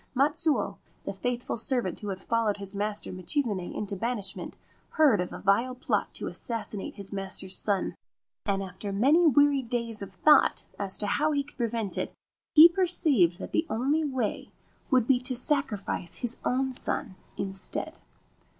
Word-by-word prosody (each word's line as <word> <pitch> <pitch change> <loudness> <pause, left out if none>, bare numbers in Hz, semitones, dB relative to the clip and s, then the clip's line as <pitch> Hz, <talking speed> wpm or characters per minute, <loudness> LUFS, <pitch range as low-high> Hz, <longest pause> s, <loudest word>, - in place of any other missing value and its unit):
Matsuo, 285 -2 +1 0.3
the 200 - -3
faithful 245 +4 -3
servant 235 - 0
who 210 - -7
had 190 -2 -4
followed 225 0 0
his 200 0 -8
master 205 +1 -2
Michizane 185 - -2
into 200 -1 -4
banishment, 210 -1 -3 0.4
heard 280 - +4
of 180 - -4
a - - -6
vile 230 +6 +1
plot 255 - -1
to - - -3
assassinate 225 -4 -4
his 200 0 -6
master's 190 -1 -2
son, 200 -1 0 0.5
and 195 -1 -1
after 190 +2 -6
many 285 - +4
weary 285 0 +4
days 235 -3 -2
of 195 -1 -7
thought 300 +9 +4
as 195 -1 +2
to 210 - -2
how 300 +9 +1
he 285 -1 +1
could 290 - -18
prevent 230 -5 -2
it - - -3 0.4
he 315 +2 +11
per 365 +2 0
ceived 260 - +2
that - - -8
the 320 - 0
only 275 +8 +1
way 260 -7 -2 0.4
would 255 -4 +3
be 255 0 +3
to 255 +1 -1
sacrifice 245 - 0
his 245 -1 -1
own 265 +1 0
son 250 -3 0 0.2
instead. 195 0 0
230 Hz, 165 wpm, -28 LUFS, 200-270 Hz, 0.5 s, he